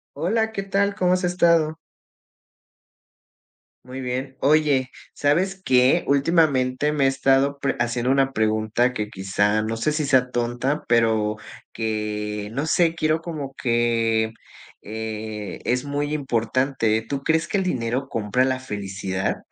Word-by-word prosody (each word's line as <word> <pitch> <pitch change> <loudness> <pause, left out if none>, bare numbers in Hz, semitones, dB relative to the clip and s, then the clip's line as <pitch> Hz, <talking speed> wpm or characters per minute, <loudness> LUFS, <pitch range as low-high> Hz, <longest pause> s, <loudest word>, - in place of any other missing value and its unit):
Hola, 220 +5 0
¿qué 200 - -3
tal?, 200 +1 +1
¿cómo 180 -3 +2
has 185 +1 0
estado? 170 -3 +2 2.1
Muy 130 +1 -7
bien, 130 +1 -4
oye, 145 -3 +3 0.2
¿sabes 185 +7 +1
qué?, 125 0 +4
ultimamente 140 -2 +2
me 145 -2 +1
he - - +5
estado 135 +1 +2
pre 140 -1 -1
haciendo 120 +1 0
una 135 0 +2
pregunta 110 +2 +1
que 105 -3 -3
quizá 105 +2 0
no 110 +1 -2
sé 115 +7 0
si 150 0 -1
sea 130 -2 +3
tonta, 120 +5 -1
pero 110 -2 +2 0.4
que, 105 -2 -3
no 140 +5 -2
sé, 165 0 +3
quiero 155 -1 0
como 145 -5 -6
que, 115 -2 +1 0.5
eh, 110 -1 -6
es 125 +2 0
muy 145 +1 -2
importante, 125 -4 0
¿tú 140 -1 -3
crees 160 +2 +1
que 200 - -1
el 195 - +1
dinero 130 -5 -2
compra 115 +2 0
la 130 0 0
felicidad? 100 -5 -3
130 Hz, 140 wpm, -23 LUFS, 110-150 Hz, 2.1 s, he